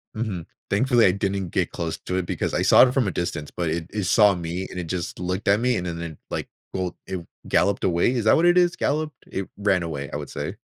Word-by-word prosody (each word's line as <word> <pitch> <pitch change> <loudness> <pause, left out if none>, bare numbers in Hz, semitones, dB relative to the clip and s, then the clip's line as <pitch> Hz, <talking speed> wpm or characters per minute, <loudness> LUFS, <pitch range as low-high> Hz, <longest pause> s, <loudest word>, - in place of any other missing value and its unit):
Mhm. 105 -7 -3 0.2
Thankfully, 120 +2 +4
I 90 - +6
didn't 95 -1 -2
get - - 0
close 80 -1 -3
to 90 - -4
it 95 - -1
because - - -2
I - - +1
saw 130 - +7
it 125 - -2
from 130 -6 +2
a - - 0
distance, 80 -3 -3
but 85 -2 -2
it 80 +1 -2
it 105 -2 -2
saw 105 +2 +5
me 90 +1 -4
and 90 - -6
it 90 - -4
just 85 -1 -4
looked 90 +2 -3
at 100 +1 +5
me 125 +1 +2
and 90 - -2
then 85 -1 -4
it, 85 -2 -6
like, - - -3 0.3
bo 90 -2 -2
it 95 -3 -5 0.2
galloped 100 +3 +2
away. 85 +5 +2
Is 120 -4 -1
that 110 - +6
what 165 - +3
it 175 +1 +5
is? 175 -1 +4
Galloped? 150 +1 -1 0.2
It 95 0 -3
ran 100 -3 +2
away, 70 -4 -4
I - - -5
would - - -5
say. - - -4
95 Hz, 260 wpm, -24 LUFS, 85-110 Hz, 0.3 s, saw